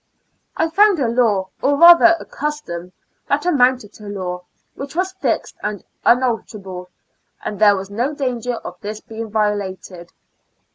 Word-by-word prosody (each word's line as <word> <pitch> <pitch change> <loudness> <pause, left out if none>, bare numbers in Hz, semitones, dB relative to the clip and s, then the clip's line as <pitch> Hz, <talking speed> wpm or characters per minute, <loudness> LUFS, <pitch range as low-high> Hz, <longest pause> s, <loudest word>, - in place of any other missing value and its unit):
I 325 - +2
found 400 +3 +4
a 270 -5 0
law, 225 -5 +1
or 285 +1 +2
rather 340 +1 +8
a - - -9
custom 225 - -5 0.4
that 290 +3 0
amounted 255 - +2
to 210 - -12
law, 180 -3 -5 0.3
which 275 +2 -8
was 370 +2 0
fixed 380 0 -2
and 210 -2 -4 0.2
unalterable, 215 -7 0 0.6
and 205 - -4
there 205 -1 +6
was 195 +1 -6
no 240 +7 -1
danger 250 -3 -2
of 180 -5 -9
this 210 +1 -5
being 225 0 -8
violated. 200 -4 -3
225 Hz, 145 wpm, -19 LUFS, 200-280 Hz, 0.6 s, rather